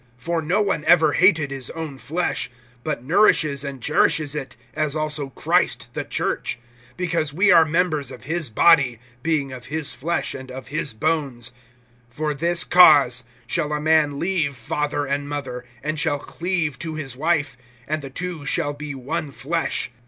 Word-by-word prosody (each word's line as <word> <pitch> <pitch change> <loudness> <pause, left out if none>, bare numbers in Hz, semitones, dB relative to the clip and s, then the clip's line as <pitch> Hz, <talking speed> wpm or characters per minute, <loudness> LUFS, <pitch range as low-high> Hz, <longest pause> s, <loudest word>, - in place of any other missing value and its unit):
(29)For 165 +5 -2
no 180 +7 +1
one 195 -7 -1
ever 165 -3 +5
hated 160 -2 +3
his 135 -2 -4
own 160 -4 -6
flesh; 165 +6 -2 0.3
but 150 -6 -3
nourishes 155 -4 +3
and 135 -4 -6
cherishes 150 -1 +2
it, 145 -3 -5 0.2
as 155 -1 -1
also 150 -2 -1
Christ - - 0
the - - -3
church; - - -2 0.4
(30)because 170 -4 -1
we 190 +5 +4
are 165 -2 +7
members 155 -4 0
of - - -10
his 160 +1 -2
body, 135 0 +4 0.2
[being] 145 -2 0
of 125 -2 -9
his 155 -1 -2
flesh, 170 +5 -2
and 130 0 -8
of 130 +1 -8
his 150 -4 -2
bones. 135 -3 -1 0.7
(31)For 150 -1 -1
this 170 +1 +1
cause 140 -8 +6 0.2
shall 150 +4 -1
a 150 - 0
man 155 -2 +3
leave 165 -5 0
father 145 +3 -2
and 140 +1 -2
mother, 135 -4 -5 0.2
and 155 +1 -2
shall 150 -3 +1
cleave 165 -2 -3
to 160 -2 -5
his 135 -5 -5
wife, 150 -2 0 0.3
and 155 +1 -2
the 135 - -7
two 175 +2 -5
shall 145 +1 -1
be 145 -1 -6
one 150 +4 -3
flesh. 150 -1 -2
150 Hz, 165 wpm, -22 LUFS, 140-165 Hz, 0.7 s, are